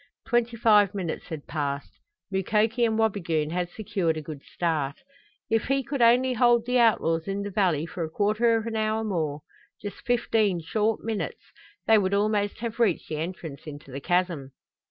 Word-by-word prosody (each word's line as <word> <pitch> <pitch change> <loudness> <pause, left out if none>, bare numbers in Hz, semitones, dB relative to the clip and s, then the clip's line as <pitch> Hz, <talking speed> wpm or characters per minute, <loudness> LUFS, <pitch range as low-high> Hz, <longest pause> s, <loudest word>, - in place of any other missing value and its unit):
Twenty 240 -1 +1
five 210 -3 +4
minutes 180 -5 -3
had 160 -4 -6
passed. 140 -2 -4 0.3
Mukoki 215 +5 +1
and 220 -1 0
Wabigoon 170 -8 0
had 175 0 -1
secured 190 -5 -1
a - - -3
good 150 -2 -8
start. 155 -5 -1 0.5
If 225 -1 +1
he 275 +1 +1
could 275 +1 -3
only 250 +2 +5
hold 240 -1 +4
the 250 0 +2
outlaws 165 -8 +2
in 195 +1 -2
the 205 - -5
valley 180 -6 +1
for 170 0 -5
a 160 - -3
quarter 215 +6 +2
of 225 - -3
an 230 -1 -3
hour 220 0 0
more 160 -8 -2 0.4
just 205 -1 -7
fifteen 225 -6 +1
short 215 +6 0
minutes 220 -2 -4 0.3
they 220 -1 +6
would 195 0 +1
almost 205 0 0
have 235 0 -4
reached 210 -8 +1
the 155 - -3
entrance 160 -3 -6
into 145 -2 -9
the 135 - -5
chasm. 175 -6 0
205 Hz, 175 wpm, -26 LUFS, 165-225 Hz, 0.5 s, they